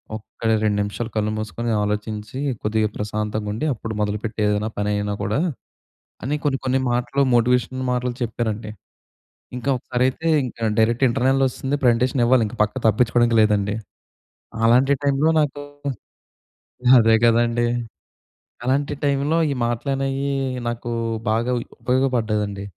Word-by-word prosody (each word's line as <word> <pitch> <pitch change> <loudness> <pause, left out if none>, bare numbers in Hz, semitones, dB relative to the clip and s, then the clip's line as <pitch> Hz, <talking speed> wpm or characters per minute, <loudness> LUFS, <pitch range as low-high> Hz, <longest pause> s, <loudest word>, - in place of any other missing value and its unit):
ఒక్క 110 +1 -12 0.2
2 105 -1 +1
నిమిషాలు 105 +3 -3
కళ్ళు 105 0 0
మూసుకొని 110 +2 -3
ఆలోచించి 105 +3 -3 0.2
కొద్దిగా 110 0 +1
ప్రశాంతంగా 105 0 -3
ఉండి 110 +9 -3
అప్పుడు 110 -1 -6
మొదలుపెట్టు 105 +2 -2
ఏదైనా 105 +1 0
పని 105 0 -1
ఐనా 105 0 -2
కూడా", 105 +7 0 0.9
అని 145 +3 -1
కొన్ని 140 -2 +1
కొన్ని 130 +1 +2
మాటలు 125 +3 0
మోటివేషనల్ 125 +2 +2
మాటలు 125 0 -1
చెప్పారండి. 110 -1 -3 0.9
ఇంకా 125 +3 -3
ఒకసారైతే 130 +6 -1 0.2
ఇంకా 115 -2 -3
డైరెక్ట్ 115 +3 +2
ఇంటర్నల్ 135 +2 +2
వస్తుంది, 135 +2 -3
ప్రజెంటేషన్ 125 +1 +3
ఇవ్వాలి. 125 -1 +4
ఇంక 120 - -9
పక్క 105 +4 -3
తప్పించుకోవడానికి 120 +1 +3
లేదండి. 105 -1 +2 0.9
అలాంటి 125 +4 +5
టైమ్‌లో 140 +3 +3
నాకు 145 -1 -2 1.4
అదే 115 0 +5
కదండీ! 120 0 +3 1.0
అలాంటి 140 +3 0
టైమ్‌లో 145 +3 +1
ఈ - - -1
మాటలనేయి 135 +3 -1 0.4
నాకు 120 0 -4 0.4
బాగా 115 +3 +1 0.3
ఉపయోగపడ్డాదండి. 110 -6 0
120 Hz, 120 wpm, -22 LUFS, 110-130 Hz, 1.4 s, అలాంటి